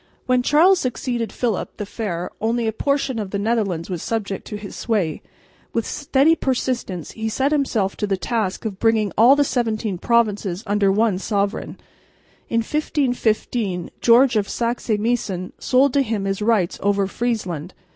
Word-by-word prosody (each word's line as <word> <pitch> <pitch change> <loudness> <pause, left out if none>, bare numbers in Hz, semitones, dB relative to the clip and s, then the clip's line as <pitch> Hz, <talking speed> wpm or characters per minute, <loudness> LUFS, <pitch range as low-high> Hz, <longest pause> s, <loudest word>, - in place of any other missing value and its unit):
When 255 0 +3
Charles 335 +8 +5
succeeded 245 -3 -2
Philip 230 -5 -2
the 210 - -4
Fair 185 -5 -4
only 230 +2 0
a 220 - +1
portion 275 -1 0
of 205 -3 -4
the 200 - -2
Netherlands 200 -6 -1
was 180 -4 -4
subject 205 -4 -3
to 210 - -5
his 205 -1 -9
sway. 200 -9 -1 0.5
With 230 -2 0
steady 290 +2 +2
persistence 250 - -2
he 220 0 -3
set 265 +6 0
himself 235 -10 0
to 210 - -1
the 195 -1 0
task 215 -1 -2
of 200 -3 -4
bringing 220 -2 +2
all 240 +5 +7
the 290 - +3
seventeen 220 -7 -1
provinces 210 -4 +1
under 205 -1 +2
one 210 -2 +2
sovereign. 200 0 -2 0.7
In 230 - +2
1515 240 - -1
George 240 +1 +5
of 205 -2 0
Saxe 235 +1 -2
Meissen 205 -5 -2
sold 260 +1 +3
to 280 - +4
him 220 -6 -2
his 195 +1 -2
rights 210 -5 +1
over 200 0 +2
Friesland. 190 -7 -3
220 Hz, 160 wpm, -21 LUFS, 200-245 Hz, 0.7 s, all